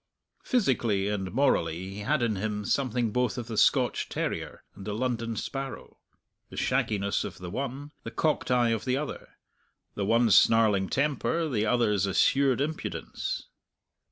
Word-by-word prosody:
Physically 115 Hz, -, +1 dB
and 95 Hz, -3 st, -2 dB
morally 95 Hz, -, +1 dB
he 100 Hz, -, -7 dB
had 130 Hz, +5 st, 0 dB
in 110 Hz, -3 st, +1 dB
him 105 Hz, +1 st, -3 dB
something 125 Hz, -4 st, 0 dB
both 125 Hz, +1 st, 0 dB
of 120 Hz, -, -4 dB
the 115 Hz, -1 st, -6 dB
Scotch -, -, +2 dB
terrier -, -, -4 dB
and 95 Hz, -, -11 dB
the 105 Hz, -, -2 dB
London 115 Hz, -1 st, -2 dB
sparrow 135 Hz, +4 st, -6 dB, 0.5 s
the -, -, -11 dB
shagginess 100 Hz, -2 st, 0 dB
of -, -, -7 dB
the 90 Hz, -1 st, -7 dB
one, 135 Hz, +5 st, -4 dB
the -, -, -6 dB
cocked 150 Hz, +6 st, 0 dB
eye 120 Hz, -2 st, +3 dB
of 115 Hz, -2 st, -1 dB
the 130 Hz, 0 st, 0 dB
other; 150 Hz, +1 st, -6 dB, 0.6 s
the 100 Hz, -, -3 dB
one's 115 Hz, 0 st, +4 dB
snarling 105 Hz, -4 st, +4 dB
temper, 150 Hz, +3 st, 0 dB
the 110 Hz, -6 st, 0 dB
other's 105 Hz, -5 st, +2 dB
assured 135 Hz, +7 st, +3 dB
impudence. 155 Hz, +2 st, -4 dB
115 Hz, 155 wpm, -28 LUFS, 105-135 Hz, 0.6 s, one's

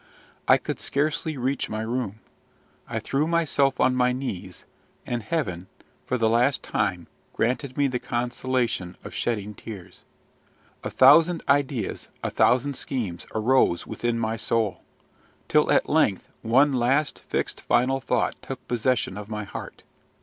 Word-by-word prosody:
I -, -, +7 dB
could -, -, -5 dB
scarcely 155 Hz, +1 st, -1 dB
reach 130 Hz, +2 st, -1 dB
my 110 Hz, 0 st, -3 dB
room. 110 Hz, -2 st, -3 dB, 0.7 s
I -, -, -2 dB
threw 145 Hz, +3 st, 0 dB
myself 145 Hz, -5 st, +2 dB
on 130 Hz, -, +4 dB
my 125 Hz, 0 st, +3 dB
knees; 100 Hz, -9 st, -5 dB, 0.4 s
and 120 Hz, -1 st, -2 dB
Heaven, 105 Hz, -, -2 dB, 0.4 s
for 125 Hz, -, 0 dB
the 115 Hz, -2 st, +2 dB
last 120 Hz, +5 st, +2 dB
time, 90 Hz, -2 st, -1 dB, 0.3 s
granted 130 Hz, +3 st, -1 dB
me 145 Hz, -, +3 dB
the 125 Hz, -2 st, 0 dB
consolation 120 Hz, -6 st, -1 dB
of -, -, -8 dB
shedding 105 Hz, -3 st, -2 dB
tears. 95 Hz, -3 st, -10 dB, 0.8 s
A -, -, -3 dB
thousand 160 Hz, +6 st, +6 dB
ideas, 140 Hz, -6 st, 0 dB, 0.2 s
a -, -, -1 dB
thousand 130 Hz, +3 st, +3 dB
schemes, 105 Hz, -13 st, -4 dB
arose 110 Hz, -6 st, +3 dB
within 120 Hz, -1 st, -2 dB
my 115 Hz, 0 st, -1 dB
soul; 110 Hz, -4 st, 0 dB, 0.7 s
till -, -, +3 dB
at -, -, +3 dB
length -, -, +1 dB
one 135 Hz, +6 st, +4 dB
last, 130 Hz, +4 st, +1 dB
fixed, -, -, -3 dB
final 135 Hz, +2 st, +2 dB
thought -, -, 0 dB
took -, -, -8 dB
possession 120 Hz, -4 st, 0 dB
of 105 Hz, +1 st, -9 dB
my 105 Hz, -1 st, -3 dB
heart. 100 Hz, -, -8 dB
125 Hz, 140 wpm, -25 LUFS, 110-135 Hz, 0.8 s, I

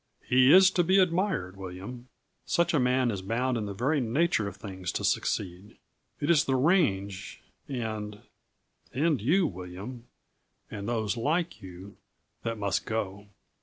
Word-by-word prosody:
"He 130 Hz, +2 st, +5 dB
is 190 Hz, +2 st, +8 dB
to 175 Hz, -, +2 dB
be 185 Hz, +3 st, +3 dB
admired, 180 Hz, -, +1 dB
William. 95 Hz, +7 st, -8 dB, 0.4 s
Such 170 Hz, 0 st, +1 dB
a 150 Hz, -, +3 dB
man 125 Hz, -1 st, +2 dB
is 100 Hz, -3 st, -4 dB
bound 120 Hz, +6 st, -1 dB
in 110 Hz, -3 st, -2 dB
the 100 Hz, -, -5 dB
very 140 Hz, +7 st, +1 dB
nature 120 Hz, -2 st, +1 dB
of 100 Hz, -, -7 dB
things 95 Hz, -3 st, -5 dB
to -, -, -3 dB
succeed. 95 Hz, +1 st, -2 dB, 0.4 s
It 145 Hz, +3 st, +1 dB
is 155 Hz, -4 st, +4 dB
the 135 Hz, -, +1 dB
range 115 Hz, -, +1 dB, 0.3 s
and 110 Hz, -5 st, -4 dB, 0.7 s
and 150 Hz, -1 st, +1 dB
you, 175 Hz, -, +3 dB
William, 95 Hz, -, -7 dB, 0.6 s
and 100 Hz, +1 st, -5 dB
those 110 Hz, -4 st, -1 dB
like 160 Hz, +3 st, -1 dB
you, 95 Hz, +1 st, -11 dB, 0.4 s
that 115 Hz, -1 st, -3 dB
must 100 Hz, -2 st, -1 dB
go. 100 Hz, -2 st, -3 dB
115 Hz, 150 wpm, -28 LUFS, 100-145 Hz, 0.7 s, is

